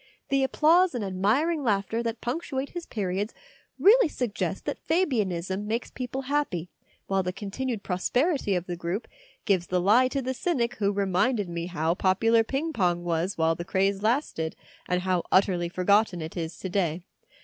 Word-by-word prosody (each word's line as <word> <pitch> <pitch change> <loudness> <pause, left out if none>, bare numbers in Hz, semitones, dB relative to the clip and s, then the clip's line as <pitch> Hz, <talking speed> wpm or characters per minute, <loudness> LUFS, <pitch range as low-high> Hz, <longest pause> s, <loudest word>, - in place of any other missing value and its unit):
The 275 0 +2
applause 325 +4 +4
and 225 -4 -2
admiring 235 - +1
laughter 215 0 0
that 230 -1 -3
punctuate 270 +1 -3
his 345 -1 -6
periods 200 0 -2 0.4
really 455 +2 +6
suggest 245 -7 -3
that - - -3
Fabianism 205 - 0
makes 230 +3 -2
people 255 +1 -4
happy, 255 - -1 0.3
while 195 0 +1
the 180 0 -2
continued 215 +4 -4
prosperity 245 - 0
of 175 -1 -2
the 175 - -4
group 175 +5 -4 0.4
gives 185 -4 +1
the 180 - +1
lie 215 +8 +5
to 270 +1 -2
the 260 +1 -1
cynic 245 -4 -1
who 200 -2 +1
reminded 200 +2 +1
me 170 0 -4
how 165 -2 0
popular 225 +5 +3
ping 285 +7 -2
pong 175 -6 +1
was 175 +3 -1
while 160 0 +3
the 170 - -5
craze 195 +2 0
lasted, 215 - 0 0.3
and 180 0 0
how 185 -2 +1
utterly 180 -2 +3
for 180 +1 -4
gotten 200 -1 +3
it 160 0 -6
is 165 -2 -4
to 190 - -5
day. 175 -3 -1
200 Hz, 170 wpm, -27 LUFS, 180-255 Hz, 0.4 s, really